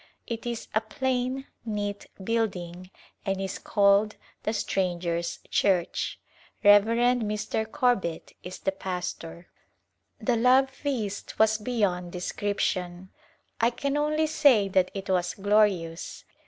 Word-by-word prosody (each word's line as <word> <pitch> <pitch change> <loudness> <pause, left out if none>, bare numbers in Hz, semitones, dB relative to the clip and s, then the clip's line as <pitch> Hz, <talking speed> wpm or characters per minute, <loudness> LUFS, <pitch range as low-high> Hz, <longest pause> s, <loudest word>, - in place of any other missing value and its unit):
It 230 0 -5
is 235 -1 -4
a 220 - +3
plain, 255 +3 -2 0.2
neat 205 -2 -3 0.2
building, 185 -5 -2 0.3
and 195 -1 -1
is 195 -1 -4
called 205 +1 +3
" - - -33
The 215 - +1
Stranger's 175 -5 -1
Church." 180 -4 +1 0.4
Rev. 205 0 +8
Mr. 220 -2 0
Corbit 240 - 0
is 185 +1 -7
the 195 - -1
pastor. 180 -3 -5 0.7
The 245 - +1
love 260 +3 +4
feast 245 -8 -4
was 220 0 +4
beyond 200 -6 -1
description. 185 -1 -2 0.5
I 230 - +4
can 275 +4 -2
only 305 +1 +1
say 285 -10 +4
that 185 -1 +2
it 195 0 -5
was 180 -2 0
glorious. 195 -5 +1
205 Hz, 120 wpm, -27 LUFS, 185-235 Hz, 0.7 s, Rev